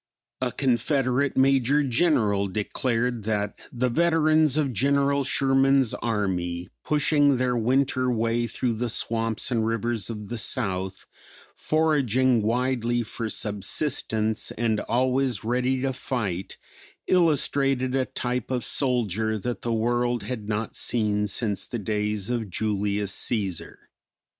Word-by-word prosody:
A 125 -1 0
Confederate 135 +1 +1
Major 135 +2 +3
General 115 - +2
declared 115 +4 -1
that 105 -2 -1 0.2
the 125 +1 0
veterans 155 0 +3
of 140 -4 0
General 140 +4 +2
Sherman's 135 -2 +3
army, 90 -6 -2
pushing 145 -2 +3
their 125 0 0
winter 130 +2 +1
way 115 0 0
through 120 +1 -1
the 120 +2 -2
swamps 115 +1 -2
and 115 -2 +1
rivers 115 -2 -1
of 105 -3 -6
the 120 -1 -4
South; 95 -4 -2 0.5
foraging 130 -6 +2
widely 120 +1 0
for 115 0 -5
subsistance 110 +1 -1
and 110 -2 +1
always 130 -1 0
ready 125 +3 0
to 135 -1 0
fight, 100 -8 -4 0.5
illustrated 140 -6 +2
a 130 -1 +1
type 125 -2 -3
of 125 -2 -1
soldier 110 -5 0
that 120 +4 -4
the 120 - -2
world 120 +2 0
had 110 -5 -5
not 110 +1 -2
seen 105 -3 0
since 105 0 -2
the 120 - -4
days 105 0 -2
of 115 -4 -2
Julius 100 0 -1
Cæsar. 100 -7 -2
120 Hz, 125 wpm, -25 LUFS, 110-130 Hz, 0.5 s, Major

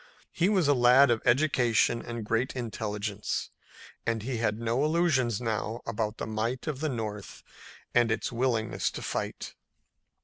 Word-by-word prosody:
He 175 +3 +1
was 190 -7 +2
a 145 - +5
lad 125 +1 +6
of 115 - +1
education 120 -3 +3
and 115 -2 -6
great 115 +5 0
intelligence, 105 -3 -3 0.5
and 115 -2 -1
he 125 0 -2
had 110 -2 0
no 115 +4 0
illusions 150 - +2
now 115 -1 -2
about 110 -1 -2
the - - -4
might 110 +3 -2
of 150 -4 -3
the 155 +1 -1
North 110 -5 -5 0.5
and 120 -2 +4
its 110 - -1
willingness 120 -2 0
to - - -7
fight. - - -4
120 Hz, 150 wpm, -28 LUFS, 110-130 Hz, 0.5 s, lad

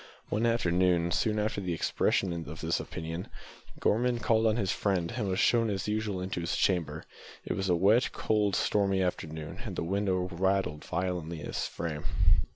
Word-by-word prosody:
One 110 +3 +1
afternoon, 90 -6 +2
soon 110 +4 +1
after 105 -1 -1
the 90 -3 -2
expression 90 +3 +1 0.2
of 80 +1 -8
this 80 +1 0
opinion, 80 +3 -5 0.5
Gorman 120 +3 +2
called 115 -1 +2
on 110 - +3
his 100 -6 0
friend, 95 -3 0
and 105 -6 -1
was 95 - 0
shown 115 +1 +3
as 100 -1 -2
usual 105 -3 -1
into 95 -1 -3
his 85 - -1
chamber. 80 -5 +1 0.4
It - - -1
was 95 0 -2
a 90 - +4
wet, 105 +8 +4
cold, 105 -2 +1
stormy 100 -2 +2
afternoon, 80 -3 -4
and - - -5
the - - -2
window 95 +1 0
rattled 95 -4 0
violently 85 -3 -2
in - - -6
its - - -2
frame. 80 -3 -5
95 Hz, 175 wpm, -30 LUFS, 85-105 Hz, 0.5 s, a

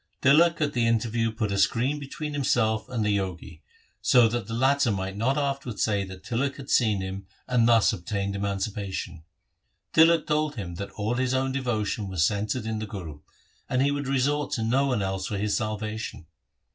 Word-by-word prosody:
Tilak 165 +5 +5
at 145 -1 +1
the 120 -2 +2
interview 115 0 +1
put 110 -2 -2
a 100 - 0
screen 125 +9 +2
between 150 +2 -6
himself 115 -6 +1
and 115 -4 -1
the 105 -1 +2
Jogi, 90 -5 -4 0.4
so 125 -2 +5
that 120 -3 -3
the 115 - -5
latter 135 +2 +3
might 95 -1 -3
not 125 +7 0
afterwards 140 -5 -2
say 100 -2 +1
that 95 -1 -10
Tilak 135 +4 -1
had 140 -1 -7
seen 110 -5 +3
him 95 0 -6 0.2
and 120 -2 +3
thus 115 0 +5
obtained 100 +1 -3
emancipation. 100 -3 -3 0.7
Tilak 165 0 +5
told 150 -1 0
him 95 -7 -5
that 100 +1 -5
all 110 +2 -1
his 130 +1 0
own 135 0 0
devotion 110 -6 -2
was 90 -4 +1
centred 105 +4 -1
in 110 -1 -2
the 110 - -4
Guru, 85 -8 -7 0.5
and 130 - +1
he 140 - +2
would 145 -1 -3
resort 140 +2 0
to 115 - -1
no 130 +5 +2
one 125 -7 0
else 95 0 -2
for 105 - -3
his 105 +1 0
salvation. 110 -4 -4
115 Hz, 190 wpm, -26 LUFS, 100-135 Hz, 0.7 s, Tilak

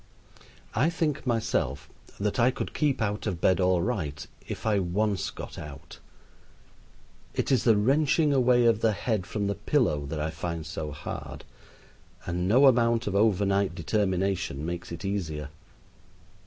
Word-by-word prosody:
I 130 +9 +2
think 155 -5 -2
myself 75 - -1 0.3
that 105 +3 -1
I 120 +2 +5
could 130 - -4
keep 140 -6 +1
out 105 +1 -2
of 90 -5 -2
bed 95 +2 +3
all 90 -2 +3
right 80 -11 -3 0.2
if - - -6
I 105 -2 +3
once 100 +2 0
got - - -8
out. 75 0 -10 1.4
It - - -1
is 130 -4 +2
the 115 -3 +5
wrenching 145 +6 +3
away 125 -2 +4
of 115 -2 +3
the 110 -1 +3
head 105 -3 -2
from 105 +1 -2
the 100 - 0
pillow 100 - 0
that 75 +2 -4
I 75 +1 -1
find 85 -2 -4
so 80 -2 -5
hard, 75 +1 -7 0.8
and 90 +1 -1
no 125 +8 +5
amount 115 -3 +4
of 100 - -2
over 100 -1 +3
night 100 -2 +1
determination 95 -4 -1
makes 85 +1 -5
it 85 +3 -6
easier. 80 -7 -3
100 Hz, 155 wpm, -27 LUFS, 85-115 Hz, 1.4 s, I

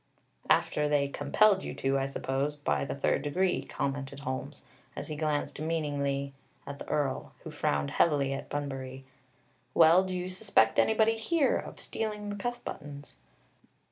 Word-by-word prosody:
"After 150 0 +3
they 140 -1 +2
compelled 190 +8 +3
you - - -5
to, 135 0 +1
I 135 - 0
suppose, 135 +2 -2
by 145 -1 0
the - - -4
third 140 0 +1
degree," 180 +6 +1
commented 140 0 -4
Holmes, 130 -1 -5 0.3
as - - -6
he 155 - -3
glanced 150 -2 -1
meaningly 145 -3 -1 0.3
at 140 0 -7
the - - -8
Earl, 145 -3 -1
who - - -7
frowned 70 -1 0
heavily 140 -4 +2
at 135 - -6
Bunbury. 135 -2 -5 0.7
"Well, 165 +3 +7
do 185 -1 -3
you 180 0 -3
suspect 185 - +2
anybody 220 0 +3
here 295 +5 +2
of - - -5
stealing 210 -2 -3
the - - -4
cuff 240 +4 -4
buttons?" 145 -1 -8
145 Hz, 155 wpm, -30 LUFS, 140-185 Hz, 0.7 s, Well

